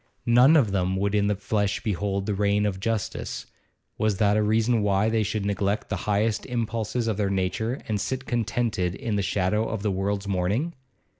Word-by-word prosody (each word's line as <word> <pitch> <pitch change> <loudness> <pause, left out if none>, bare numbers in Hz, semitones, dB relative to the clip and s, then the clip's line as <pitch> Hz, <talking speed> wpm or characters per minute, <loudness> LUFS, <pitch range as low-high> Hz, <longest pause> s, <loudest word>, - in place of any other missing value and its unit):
None 125 +6 +6
of 115 -9 +3
them 95 -1 0
would 100 +1 0
in 100 -1 +2
the 105 - +1
flesh 100 0 -1
behold 100 -1 -1
the 105 - -1
reign 100 +1 +1
of 95 -2 -2
justice; 110 0 -3 0.5
was 110 -3 +1
that 105 0 +3
a 110 - +3
reason 110 +2 +2
why 100 +1 +2
they 110 0 +1
should 105 0 -2
neglect 100 +1 -1
the - - -1
highest 105 +1 +1
impulses 115 -1 -2
of 110 -3 0
their 100 -2 0
nature 100 +6 -1
and 105 -3 -1
sit 130 0 -3
contented 110 -6 -1
in 115 -6 -3
the 100 - +1
shadow 100 +3 0
of 110 -3 -4
the 105 - +1
world's 100 +1 -2
mourning? 100 - 0
105 Hz, 195 wpm, -25 LUFS, 100-115 Hz, 0.5 s, None